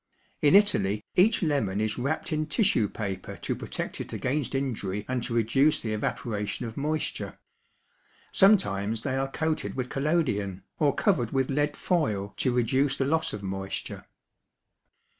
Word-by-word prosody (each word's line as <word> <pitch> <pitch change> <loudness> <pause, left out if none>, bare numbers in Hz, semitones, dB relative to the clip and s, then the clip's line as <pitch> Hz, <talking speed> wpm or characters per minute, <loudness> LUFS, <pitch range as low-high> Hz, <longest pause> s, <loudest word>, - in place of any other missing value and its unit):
In 150 +5 +5
Italy 105 - +3
each 205 +3 +4
lemon 135 - +1
is 110 +2 -1
wrapped 145 +5 -2
in 155 0 0
tissue 160 - +2
paper 95 -4 -5
to - - -1
protect - - -5
it - - -7
against 140 0 -2
injury 105 -7 -2
and 130 -1 -1
to 120 -1 -3
reduce 135 +7 +3
the 110 -2 -3
evaporation 105 +1 -2
of 115 -1 -6
moisture. 155 +2 -2 0.9
Sometimes 110 - +3
they 130 -2 -1
are 135 0 -1
coated 155 -9 -2
with 125 -1 -3
collodion 130 - 0 0.2
or 145 -2 +3
covered 140 - +2
with 135 +1 0
lead 145 +1 0
foil 105 - 0
to 130 - +1
reduce 130 +3 +2
the 135 - +1
loss 160 +3 +1
of 100 - -6
moisture. 95 0 -5
130 Hz, 150 wpm, -27 LUFS, 105-150 Hz, 0.9 s, In